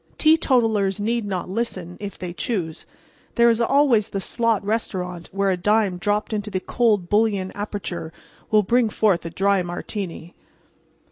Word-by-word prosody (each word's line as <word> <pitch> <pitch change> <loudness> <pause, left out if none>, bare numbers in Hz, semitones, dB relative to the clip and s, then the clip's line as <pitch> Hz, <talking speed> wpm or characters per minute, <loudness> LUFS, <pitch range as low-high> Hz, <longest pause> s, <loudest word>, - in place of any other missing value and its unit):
Teetotalers 225 - +3
need 230 +2 -1
not 185 -3 -3
listen, 185 -4 -3
if 205 -1 -6
they 180 -1 -6
choose; 175 -6 -3 0.5
there 235 -1 +5
is 230 +1 0
always 250 -4 +3
the 195 - -3
slot 225 0 0
restaurant, 180 -5 -3
where 195 0 +1
a 185 - 0
dime 205 -1 +1
dropped 210 +3 -1
into 210 0 -2
the 190 -2 -2
cold 210 -3 +1
bouillon 205 -2 +1
aperture 200 -5 -5 0.4
will 215 -1 +4
bring 235 +2 +2
forth 195 -6 +1
a - - -4
dry 195 +3 +2
Martini. 175 -1 -5
205 Hz, 150 wpm, -23 LUFS, 185-225 Hz, 0.5 s, there